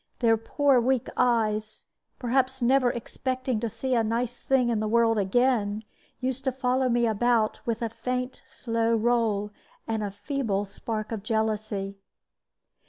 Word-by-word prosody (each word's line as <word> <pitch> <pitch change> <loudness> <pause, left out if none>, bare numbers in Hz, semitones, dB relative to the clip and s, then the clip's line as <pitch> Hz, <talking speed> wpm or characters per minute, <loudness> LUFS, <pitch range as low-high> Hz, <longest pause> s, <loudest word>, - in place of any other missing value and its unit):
Their 230 -2 +4
poor 265 +3 +2
weak 255 0 +1
eyes, 215 -3 +1 0.3
perhaps 260 +1 +1
never 255 +1 +4
expecting 255 +1 -2
to 230 0 -2
see 260 +4 -2
a 230 -2 +3
nice 230 +2 -1
thing 255 -2 +1
in 230 -2 +1
the 215 - -1
world 225 0 +3
again, 215 0 +1 0.4
used 260 +1 -2
to 265 - +2
follow 255 0 +1
me 240 0 +2
about 225 0 +2
with 230 0 -1
a 230 - -1
faint, 250 +2 -3
slow 230 -1 0
roll, 220 -3 +1 0.4
and 220 -1 -1
a 205 - -2
feeble 205 -1 -2
spark 215 +2 -5
of 220 -3 -3
jealousy. 215 -2 -2
230 Hz, 150 wpm, -27 LUFS, 215-250 Hz, 0.4 s, Their